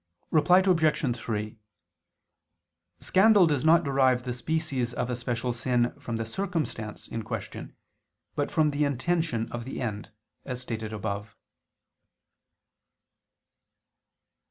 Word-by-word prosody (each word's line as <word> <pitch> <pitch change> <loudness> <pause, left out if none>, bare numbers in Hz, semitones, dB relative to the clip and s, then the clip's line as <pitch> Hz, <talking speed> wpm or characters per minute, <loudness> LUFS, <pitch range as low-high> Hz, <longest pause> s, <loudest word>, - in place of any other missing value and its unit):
Reply 175 +4 +5
Obj. 160 -8 +2
3: 110 -2 -4 1.4
Scandal 200 0 +5
does 150 -4 +1
not 165 +2 +5
derive 130 -3 +2
the 125 -1 -3
species 130 -2 -2
of 125 - -1
a - - 0
special 120 0 -2
sin 120 0 +1
from 115 -1 -4
the 115 - -2
circumstance 155 - -3
in 115 - -4
question, - - -6 0.6
but - - -1
from 155 -1 +2
the 145 +1 0
intention 140 -3 0
of 120 0 -4
the 130 - -6
end, 105 -4 -4 0.3
as 125 -2 -5
stated 110 -3 -5
above. 105 -1 -4
125 Hz, 115 wpm, -27 LUFS, 115-155 Hz, 1.4 s, Reply